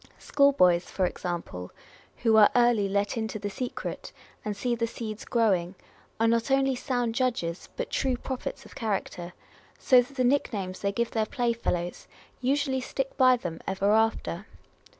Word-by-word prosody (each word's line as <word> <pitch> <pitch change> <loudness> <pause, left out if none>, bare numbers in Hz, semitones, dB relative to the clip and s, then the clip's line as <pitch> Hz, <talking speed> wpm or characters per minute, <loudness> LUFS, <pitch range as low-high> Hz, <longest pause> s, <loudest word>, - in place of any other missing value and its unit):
School 280 -1 +3
boys, 180 -9 +4
for 190 - 0
example, 170 - -4 0.5
who 225 -2 +4
are 215 -1 +8
early 240 -5 +4
let 200 +3 0
into 220 -1 -2
the 205 -1 -4
secret, 250 +4 -5 0.3
and 210 -1 -3
see 240 +4 0
the 230 0 0
seeds 220 -2 -6
growing, 195 -6 +1 0.4
are 225 - +3
not 230 +2 +1
only 270 0 +3
sound 245 -2 -1
judges, 230 -9 -1
but - - -4
true 260 -2 0
prophets 260 +1 -5
of - - -14
character; 190 -5 -3 0.4
so 255 -2 +5
that 250 +3 -10
the 255 - +2
nick 275 +3 +2
names 185 -4 -4
they 200 - 0
give 235 +3 -1
their 220 -1 0
playfellows 230 -8 -2 0.3
usually 265 0 +1
stick 270 +1 -3
by 255 -1 +5
them 175 -8 -6
ever 195 +1 +1
after. 220 -4 +1
225 Hz, 165 wpm, -27 LUFS, 195-250 Hz, 0.5 s, are